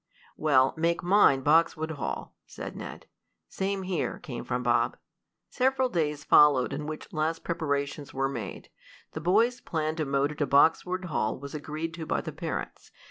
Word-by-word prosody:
"Well, 135 -4 +3
make 170 +2 0
mine 175 -7 +5
Boxwood 160 +2 +3
Hall," 145 -6 -5
said - - -8
Ned. - - -8 0.4
"Same 195 0 -2
here," 185 -1 -2
came - - -7
from - - -2
Bob. - - +2 0.5
Several 260 0 +1
busy 170 -8 +1
days 150 0 -8
followed 145 -5 +5
in 150 +1 -4
which 155 0 -7
last 160 +1 -1
preparations 145 -3 -2
were 135 0 0
made. 115 -8 -6 0.4
The 155 - -6
boys' 225 +9 +2
plan 155 -1 -2
to 155 - -1
motor 140 +1 0
to 145 -1 -1
Boxwood 180 +6 +3
Hall 110 -10 -1
was 140 +1 -9
agreed 155 +2 -5
to 165 -2 -7
by - - 0
the 155 - -6
parents. 160 +2 -5
155 Hz, 165 wpm, -28 LUFS, 145-170 Hz, 0.5 s, mine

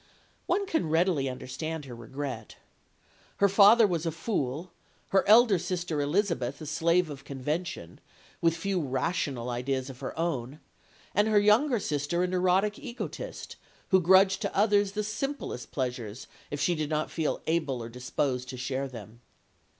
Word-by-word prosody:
One 400 - +1
can 320 - -1
readily 160 -4 +2
understand 150 +5 -5
her 130 - -9
regret. 120 -1 -6 0.8
Her 200 - +5
father 205 +4 +7
was 170 -4 -1
a - - 0
fool, 165 - -3 0.4
her 190 -1 +3
elder 220 -3 +6
sister 175 -4 -2
Elizabeth 145 - 0
a 155 - -7
slave 165 +4 +2
of 135 -2 -9
convention, 140 - -4 0.4
with 165 0 +2
few 190 +1 -1
rational 130 -3 -2
ideas 130 +2 -2
of 130 - -14
her 135 - -6
own, 150 -4 -2 0.5
and 205 +2 +3
her 215 -1 +4
younger 225 +5 +4
sister 150 +1 -1
a - - +1
neurotic 185 +3 +1
egotist, 255 - -7 0.3
who 190 -2 +5
grudged 190 +2 +5
to - - -3
others 205 -1 +3
the 210 0 -1
simplest 245 - -4
pleasures 125 -4 -4 0.2
if 145 - -4
she 160 +5 +2
did 155 -3 -2
not 155 0 -1
feel 160 -3 -1
able 150 -7 -1
or - - -6
disposed 125 +1 -2
to 130 - -6
share 130 +2 -2
them. 115 -2 -11
160 Hz, 155 wpm, -28 LUFS, 130-190 Hz, 0.8 s, father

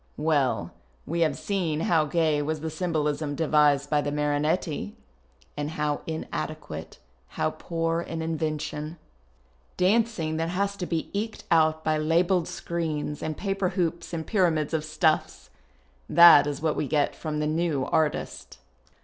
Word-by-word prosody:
Well, 150 -4 +1 0.3
we 170 +2 -2
have 155 -4 +2
seen 170 -6 -1
how 165 -2 +3
gay 155 -1 +1
was 155 +1 -2
the 160 0 -3
symbolism 155 -3 -1
devised 150 -2 +3
by 150 -1 +3
the 145 - -2
Marinetti. 150 - -1 0.6
And 145 0 -3
how 150 -2 -2
inadequate, 155 - -5 0.3
how - - -1
poor 165 0 -2
in 165 -1 -5
invention. 155 0 -3 0.8
Dancing 185 -5 +1
that 165 +1 -1
has 200 +3 -1
to 180 - -4
be 165 -2 -3
eked 215 +2 -3
out 160 -1 +3
by 155 -1 +1
labelled 170 +3 +2
screens 155 -3 -3
and 155 -1 -3
paper 195 -2 -1
hoops 175 -3 -2
and 165 -2 -4
pyramids 165 -7 +1
of 160 -1 0
stuffs! 155 0 0 0.6
That 170 -4 +8
is 145 +1 -4
what 160 -2 +1
we 145 - -1
get 145 +1 +1
from 155 -2 -4
the 150 - 0
new 155 -3 0
artist. 155 - -1
160 Hz, 145 wpm, -26 LUFS, 150-170 Hz, 0.8 s, That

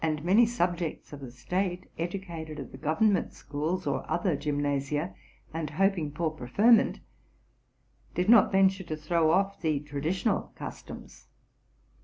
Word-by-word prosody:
many 205 +7 +5
subjects 175 -9 -2
of 145 - -7
the 135 -3 -8
state, 180 +9 -3
educated 170 -3 -5
at 135 - -8
the - - -10
government 185 +6 +1
schools 155 +5 -3
or 140 -2 -1
other 185 -7 +1
gymnasia, 145 +2 -1 0.4
and 160 -2 -3
hoping 175 -1 +1
for 160 +1 -1
preferment, 200 - +3 1.2
did 180 +2 0
not 230 -1 +6
venture 190 0 +3
to 155 -3 -5
throw 160 +1 +1
off 195 +4 +1
the 155 -3 +1
traditional 150 +5 -1
customs. - - -9
165 Hz, 130 wpm, -28 LUFS, 150-190 Hz, 1.2 s, not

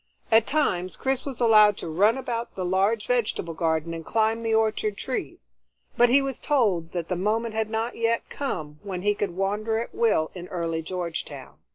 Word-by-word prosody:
At 225 0 +5
times 185 -12 0
Chris 265 +1 -1
was 265 -4 -5
allowed 215 -3 +6
to - - -6
run 200 +9 +3
about 240 -3 -4
the 185 - -3
large 200 +4 +1
vegetable 230 -8 -1
garden 160 0 -1
and 165 0 -6
climb 225 +4 +1
the 225 -1 +1
orchard 215 -2 +1
trees, - - -5 0.5
but 240 0 +5
he 275 +3 +5
was 270 -2 -4
told 200 - +1
that 170 -2 -3
the 180 - -1
moment 215 +5 0
had 220 0 -1
not 225 +2 -2
yet 230 0 0
come 150 - -5
when 185 -3 -5
he 205 0 +3
could 195 -3 -3
wander 210 +3 0
at 230 - -4
will 210 -9 +2
in 180 -1 -8
early 165 -2 -2
Georgetown. 165 -5 -6
210 Hz, 190 wpm, -25 LUFS, 175-230 Hz, 0.5 s, allowed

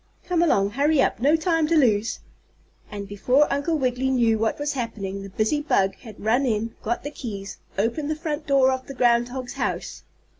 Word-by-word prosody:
Come 355 -2 +1
along, 200 -12 +3
hurry 285 +5 +2
up, - - +2
no 290 +5 +4
time 325 -1 +1
to 330 +1 +3
lose!" 225 -6 +2 0.7
And 200 -1 -6
before 250 +8 +3
Uncle 285 +3 0
Wiggily 255 -1 0
knew 230 -4 +2
what 225 0 0
was 290 0 -2
happening 210 -6 -4
the 195 - -8
busy 220 +9 0
bug 195 -10 +2
had 220 -4 -12
run 240 +5 +3
in, 225 -2 -1
got 235 +2 -2
the 290 - -5
keys, 200 -8 -7 0.2
opened 235 +9 -1
the 310 - 0
front 305 -1 -4
door 270 -2 +4
of 260 0 -4
the 275 - -8
groundhog's 245 +1 +1
house. - - -3
255 Hz, 190 wpm, -24 LUFS, 220-295 Hz, 0.7 s, no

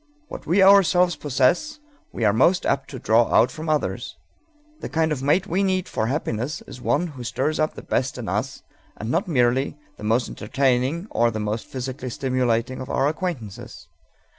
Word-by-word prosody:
What - - -9
we 190 +5 +4
ourselves 180 -3 +5
possess 145 - +1 0.3
we 115 - -2
are 105 - +4
most 175 - +3
apt 135 -1 0
to 135 - -7
draw 115 0 +2
out 115 - +4
from 155 0 -6
others. 155 -1 -2 0.6
The - - -6
kind 160 0 +1
of 140 -4 -2
mate 150 +7 +2
we 190 0 0
need 185 -2 0
for 110 - -2
happiness 130 0 -3
is 125 - -11
one 145 +7 +1
who 130 -5 -9
stirs 135 +6 -1
up 155 0 0
the - - -9
best 130 0 -1
in 120 -4 -6
us, 110 +8 -3 0.3
and 110 +3 -4
not 180 +5 0
merely 130 -2 +1 0.2
the - - -11
most 115 +3 +1
entertaining 130 - 0
or 120 0 +2
the 110 -1 -4
most 105 +1 -3
physically 130 0 -5
stimulating 125 -1 -1
of 130 - -7
our 135 - +1
acquaintances. 150 - -5
135 Hz, 185 wpm, -23 LUFS, 120-160 Hz, 0.6 s, ourselves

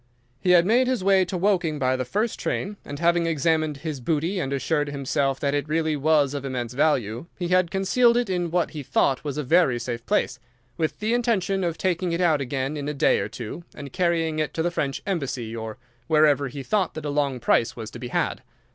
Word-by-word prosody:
"He 180 +3 +5
made 240 +7 +3
his 250 -7 0
way 190 -1 +4
to 180 +1 -4
Woking 175 -5 +1
by 130 -2 +1
the 130 0 -2
first 210 - -1
train, 205 +2 -2
and 145 - -7
having 170 +1 +2
examined 155 -1 +1
his 150 -1 -5
booty 165 +8 -1
and 135 -6 -2
assured 145 +2 0
himself 135 -1 -1
that 140 -1 0
it 145 0 -1
really 160 0 +1
was 145 -1 +2
of 140 -2 -4
immense 125 -3 -4
value, 125 -3 0
he 175 -1 -3
had 185 -1 +3
concealed 235 +6 +3
it 245 -1 +1
in 180 -2 -1
what 175 0 0
he 150 - -6
thought 135 0 +1
was 145 -1 -4
a 150 - -1
very 140 -3 +3
safe 120 -1 -4
place, - - 0 0.4
with 160 -1 -2
the 220 +2 +1
intention 200 -6 +1
of 170 -2 -1
taking 180 -1 0
it 170 - -1
out 160 -5 +3
again 135 +2 -2
in 145 0 -3
a 150 - -4
day - - +3
or - - -3
two, 120 +8 -7
and 140 -2 -9
carrying 165 -3 +1
it 155 - -2
to 160 - 0
the 175 - 0
French 140 -5 -2
embassy, 135 - -3
or 110 +1 -6 0.3
wherever 150 -2 +4
he 135 +1 -7
thought 195 +2 0
that 155 -1 -6
a 145 - -1
long 140 -3 0
price 115 0 +2
was 110 -2 -7
to 120 - -9
be 125 - -5
had. - - -1
155 Hz, 225 wpm, -24 LUFS, 135-180 Hz, 0.4 s, He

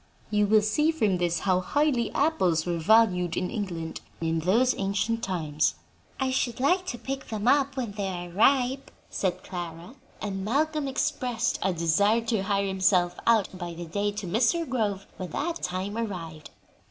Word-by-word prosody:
You 210 -1 +3
will 215 0 +5
see 300 +9 +2
from 215 - +1
this 175 -1 0
how 185 -2 +2
highly 250 +4 +1
apples 185 - +2
were 175 -1 -1
valued 180 -3 +3
in 180 - -1
England 170 -6 -4 0.2
in 165 0 0
those 225 +10 +3
ancient 200 +4 0
times." 155 -7 0 0.4
"I 265 -1 0
should 245 -2 -1
like 360 +8 +2
to 240 - -3
pick 270 +2 -5
them 215 0 -3
up 275 0 +3
when 240 -5 -2
they 200 -1 -3
are 175 -2 -5
ripe," 260 +7 +2 0.2
said 185 -1 -2
Clara, 175 +2 -7 0.3
and 195 -2 -4
Malcolm 300 +6 0
expressed 255 -4 -1
a 190 - +1
desire 180 +7 +2
to 225 -3 -1
hire 200 0 0
himself 185 -2 +2
out 220 -5 +3
by 175 -2 -6
the 175 +1 -6
day 200 +5 -1
to 205 -1 -5
Mr. 235 - +1
Grove 210 -6 -1
when 185 -2 -5
that 335 - -3
time 185 +3 -3
arrived. 170 -9 -5
205 Hz, 170 wpm, -27 LUFS, 180-245 Hz, 0.4 s, will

